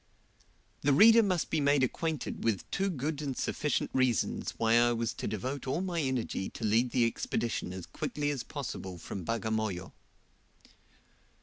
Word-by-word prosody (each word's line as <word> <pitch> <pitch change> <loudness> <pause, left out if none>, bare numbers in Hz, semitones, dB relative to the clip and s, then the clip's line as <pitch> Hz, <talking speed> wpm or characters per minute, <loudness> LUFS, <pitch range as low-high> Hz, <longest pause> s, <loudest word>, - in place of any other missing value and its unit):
The 145 - +3
reader 225 +9 +8
must 185 -6 0
be 160 - +2
made 140 -1 +3
acquainted 160 +4 -2
with 110 -5 0
two 195 0 0
good 150 -2 -3
and 135 -4 -3
sufficient 150 -3 -1
reasons 130 -3 +1
why 115 0 +2
I 120 0 +4
was 115 -2 -1
to - - -5
devote 130 +7 -4
all 135 +5 0
my 175 -3 -1
energy 130 -8 -2
to 115 - -5
lead 115 +4 +3
the 120 -1 +3
Expedition 115 -3 -2
as 95 -1 -6
quickly 145 -1 -2
as 140 -4 -3
possible 105 - -6
from 90 +3 -6
Bagamoyo. 110 -3 -2
130 Hz, 160 wpm, -31 LUFS, 110-145 Hz, -, reader